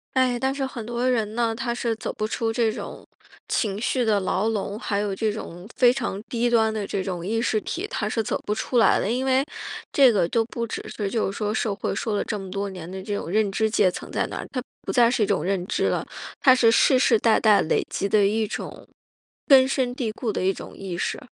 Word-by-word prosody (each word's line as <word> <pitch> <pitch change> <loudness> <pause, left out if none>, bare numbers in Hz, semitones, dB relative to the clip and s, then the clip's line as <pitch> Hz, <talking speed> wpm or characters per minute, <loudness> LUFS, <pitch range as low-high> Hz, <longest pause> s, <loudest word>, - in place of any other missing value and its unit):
唉， 255 -2 +3
但 265 +2 0
是 275 -1 -2
很 245 -4 -6
多 240 +2 -1
人 220 -4 0
呢， 230 -1 0
他 235 +1 -2
是 235 -1 -1
走 220 - -4
不 215 - -3
出 225 +1 -1
这 225 0 +1
种 215 - -7 0.4
情 205 -3 -1
绪 245 +2 0
的 215 -3 +2
牢 200 +3 0
笼， 205 -1 -3
还 205 -3 -2
有 205 -2 -1
这 215 +2 0
种 180 -4 -8
非 245 -1 +6
常 235 -6 -3
低 240 +1 -1
端 220 -2 +3
的 215 -2 -3
这 195 - -2
种 180 -2 -4
意 225 +3 0
识 220 -2 0
体， 365 - -4
他 - - -2
是 225 - 0
走 220 - -2
不 210 - 0
出 220 +3 -2
来 230 - +5
的。 - - -1
因 250 +3 0
为 265 +1 +2 0.5
这 270 -3 +6
个 195 -6 +2
都 230 +5 +1
不 235 +1 -4
只 - - -5
是 205 -2 -3
就 215 -2 -1
是 - - -8
说 210 -1 -1
社 220 -1 0
会 200 - -3
说 220 - -2
了 - - 0
这 210 - -2
么 190 -2 -8
多 200 +1 -2
年 180 -3 -8
的 190 0 -6
这 205 +1 -3
种 185 - -5
认 210 +2 +2
知 220 +2 +1
阶 210 -3 +3
层 180 - -8
在 - - 0
哪， - - -6
它 255 - -2 0.2
不 - - -4
再 240 -2 +5
是 235 -3 +1
一 - - +3
种 200 -1 0
认 190 -1 -1
知 - - -1
了， - - 0 0.4
它 260 - +7
是 245 -3 +4
世 255 +3 +4
世 235 -3 +4
代 220 +1 +3
代 210 -3 +5
累 155 - +1
积 200 - -2
的 205 0 +4
一 220 +2 +1
种 210 - -7 0.6
根 270 -3 +8
深 260 -2 -1
蒂 235 -4 -2
固 225 +2 -4
的 - - -2
一 190 - +3
种 - - -9
意 185 -3 -6
识。 - - -2
220 Hz, 270 characters per minute, -24 LUFS, 200-240 Hz, 0.6 s, 根